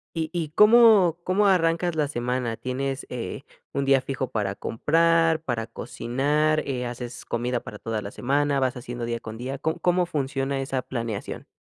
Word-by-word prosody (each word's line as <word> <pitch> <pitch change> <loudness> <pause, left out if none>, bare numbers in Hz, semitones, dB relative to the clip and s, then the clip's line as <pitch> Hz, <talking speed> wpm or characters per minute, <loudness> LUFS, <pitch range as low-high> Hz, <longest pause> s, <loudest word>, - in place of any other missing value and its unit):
¿y 160 -1 -1
y 165 -4 -2
cómo 210 -3 +6
cómo 200 +3 +2
arrancas 170 -2 +2
la 150 -2 +2
semana? 125 -3 -2
¿Tienes, 135 +1 -3
eh, 125 +2 -5 0.3
un 140 0 -1
día 135 -1 +4
fijo 130 -2 -3
para 100 -3 -1
comprar, 165 +7 +2
para 120 -7 -3
cocinar, 145 +7 0
eh, 125 -3 -2
haces 120 0 -7
comida 120 +1 -1
para 105 - -9
toda 110 -1 -3
la 100 - -6
semana, 140 +3 0
vas 130 0 0
haciendo 120 -1 -5
día 115 0 -3
con 110 0 -8
día? 130 +3 -4
¿Cóm 160 +3 -1
cómo 180 0 +2
funciona 135 -3 -2
esa 135 -1 -2
planeación? 115 -5 -5
135 Hz, 170 wpm, -25 LUFS, 120-160 Hz, 0.3 s, cómo